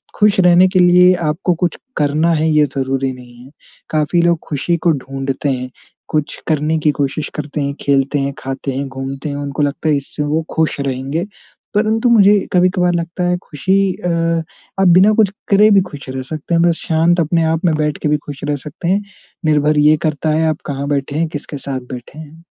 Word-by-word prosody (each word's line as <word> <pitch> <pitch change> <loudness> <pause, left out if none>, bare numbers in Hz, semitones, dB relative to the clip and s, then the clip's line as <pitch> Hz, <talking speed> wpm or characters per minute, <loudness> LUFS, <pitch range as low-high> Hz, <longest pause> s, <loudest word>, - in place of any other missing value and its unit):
खुश 210 -2 +3
रहने 180 0 +6
के 185 - +1
लिए 180 +1 +6 0.2
आपको 180 +2 -1
कुछ 175 - 0 0.2
करना 150 +3 +2
है 160 +1 +1
ये 150 -1 +4
ज़रूरी 135 0 -1
नहीं 125 -1 -14
है। 135 - -16 0.4
काफ़ी 155 +3 +1
लोग 170 -2 +2
खुशी 165 +4 -1
को - - +6
ढूँढ़ते 135 0 -3
हैं। 125 -1 -3 0.4
कुछ 150 -1 -2
करने 155 0 +1
की 150 - +4
कोशिश 145 +1 -2
करते 150 0 -4
हैं, 140 0 -2
खेलते 140 +1 +1
हैं, 140 0 -2
खाते 135 +1 -4
हैं, 140 +1 -3
घूमते 135 +2 -5
हैं। 140 - -4
उनको 145 +1 -3
लगता 145 +2 -1
है 145 - +3
इससे 145 +2 -5
वो 155 +2 -1
खुश 160 -2 0
रहेंगे। 135 +5 -2 0.5
परंतु 220 +3 +2
मुझे 205 -2 +6 0.2
कभी-कभार 180 0 +2
लगता 170 +1 -3
है 180 0 +1
खुशी 190 +6 0
अ, 180 - -4 0.7
आप 190 - +4
बिना 185 +5 +6
कुछ 215 -3 +3 0.2
करे 210 +2 +5
भी 195 -1 +6
खुश 140 -4 -10
रह 130 0 -4
सकते 155 +4 -5
हैं। 165 - +3
बस 170 -1 +3
शांत 165 +2 +2
अपने 165 +1 +1
आप 165 +2 -2
में 165 - +3
बैठ 150 -1 -1
के 150 - +1
भी 150 - +2
खुश 145 -2 -8
रह 145 - +1
सकते 155 +3 -6
हैं। 195 +2 +2 0.4
निर्भर 150 0 +2
ये 150 +1 +5
करता 155 +1 -2
है 160 +1 +2
आप 155 - -3
कहाँ 140 0 -4
बैठे 140 0 -2
हैं, 165 - +1
किसके 145 -1 -7
साथ 135 -1 -4
बैठे 125 +4 -9
हैं। 160 +2 -12
155 Hz, 205 wpm, -17 LUFS, 140-175 Hz, 0.7 s, रहने